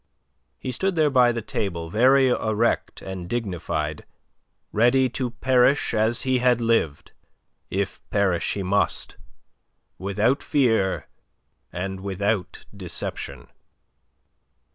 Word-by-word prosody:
He 130 - -5
stood 190 +9 -1
there 155 -3 +3
by 125 -2 +5
the 115 -2 -4
table 85 -6 -3
very 130 +5 +5
erect 115 -1 0
and 95 -2 -6
dignified, 85 -9 -3 0.7
ready 125 +4 +3
to 125 +1 -3
perish 125 +3 +2
as 110 +1 +2
he 130 -1 +1
had 125 -1 +3
lived 115 -11 0 0.6
if 95 0 -2
perish 95 -5 +1
he 100 - -3
must 100 +2 0 0.8
without 105 +8 +1
fear 115 -9 +1 0.6
and 95 +2 -4
without 100 0 -2
deception. 70 -3 -5
110 Hz, 105 wpm, -24 LUFS, 95-125 Hz, 0.8 s, by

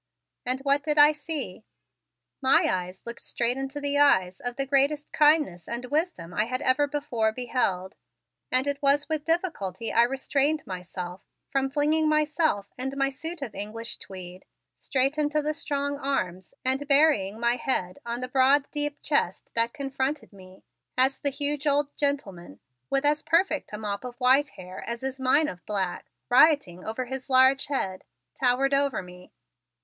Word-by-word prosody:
And 255 +1 +1
what 280 +1 +3
did 300 0 -1
I 295 +1 +8
see? 305 +1 -5 0.8
My 265 0 +5
eyes 185 0 -3
looked 235 0 -7
straight 240 +1 -1
into 270 +2 -4 0.2
eyes 190 -11 +4
of 245 0 -4
the 275 +1 -2
greatest 280 +2 +1
kindness 295 - +3
and 235 +1 -4
wisdom 295 - -1
I 210 +4 +1
had 255 +2 -2
ever 260 +3 +3
before 280 -7 -1
beheld, 220 -6 -1 0.6
and 255 +1 +3
it 285 0 -2
was 285 +1 +3
with 310 -2 -2
difficulty 265 - -2
I 230 - +5
restrained 275 +4 +1
myself 180 0 -6 0.3
from 270 0 +1
flinging 305 +2 +2
myself 305 - +1
and 265 +2 -3
my 275 0 +1
suit 320 +3 -6
of 235 -6 -6
English 220 +3 -4
tweed 185 -1 -9 0.3
straight 270 +3 0
into 300 0 +1
the 300 +1 -1
strong 285 -1 -2
arms 185 -11 -2
and 265 +2 0
burying 275 -9 +4
my 235 +1 +2
head 185 -8 -1
on 235 +1 -4
the 255 - -2
broad 270 +2 +4
deep 295 -1 -3
chest 235 - 0
that 230 0 +1
confronted 270 -3 -3
me 185 -1 -15 0.3
as 265 +1 +3
the 285 - 0
huge 290 +1 -2
old 290 0 +1
gentleman, 195 - -3 0.3
with 275 +1 +1
as 295 +1 +3
perfect 335 -3 +1
a 210 - -5
mop 205 -1 -4
of 250 -1 -7
white 265 +3 +4
hair 185 0 -9
as 235 +2 -5
is 265 0 -4
mine 275 +4 +3
of 180 -7 -7
black, 195 -4 -2 0.2
rioting 250 - +4
over 225 +4 -3
his 265 +2 -6
large 260 +1 +5
head, 190 -10 -2 0.3
towered 265 +2 +1
over 275 -6 +1
me. 180 0 -14
265 Hz, 165 wpm, -26 LUFS, 220-290 Hz, 0.8 s, I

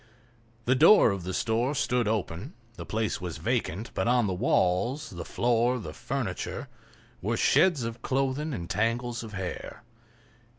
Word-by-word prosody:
The 125 - +4
door 160 - +7
of 95 -3 -4
the 95 - -3
store 120 +7 0
stood 125 -3 +1
open; 105 - -3 0.2
the - - -9
place 110 -3 -1
was 85 -3 -5
vacant, 110 +2 -2
but - - -1
on 120 -1 +3
the 95 - -1
walls, 95 +10 +1
the 85 -2 -6
floor, 120 +5 +1
the 115 - -7
furniture, 120 -9 -4 0.5
were - - -1
shreds 175 -9 +4
of 115 +1 -5
clothing 135 +3 -1
and 85 - -4
tangles 120 +4 -1
of 110 -2 -9
hair. 95 +4 -6
115 Hz, 155 wpm, -28 LUFS, 95-125 Hz, 0.5 s, door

